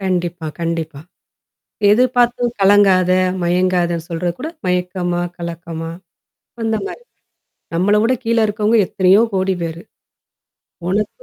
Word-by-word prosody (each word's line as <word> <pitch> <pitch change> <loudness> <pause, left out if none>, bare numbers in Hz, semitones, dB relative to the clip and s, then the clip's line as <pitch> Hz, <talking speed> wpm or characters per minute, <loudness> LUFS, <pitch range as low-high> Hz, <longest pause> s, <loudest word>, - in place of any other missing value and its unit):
கண்டிப்பா, 175 -3 -2
கண்டிப்பா. 165 -3 -3 0.9
எதிர்பார்த்தும் 245 0 +2
கலங்காத, 195 -2 +5 0.3
மயங்காதன்னு 175 -1 0
சொல்றதுகூட 175 - -3 0.2
மயக்கமா, 180 -1 -1 0.2
கலக்கமா 165 -1 -6 0.7
அந்த 225 0 0
மாரி. 480 +4 -8 0.7
நம்மள 195 +5 +3
விட 250 +3 +3
கீழ 230 0 +1
இருக்கவங்க 215 +2 +1
எத்தனையோ 190 +3 +4
கோடி 190 0 +1
பேரு. 165 +1 -5 1.1
உனக்கு 210 - -2
185 Hz, 95 wpm, -18 LUFS, 170-210 Hz, 1.1 s, கலங்காத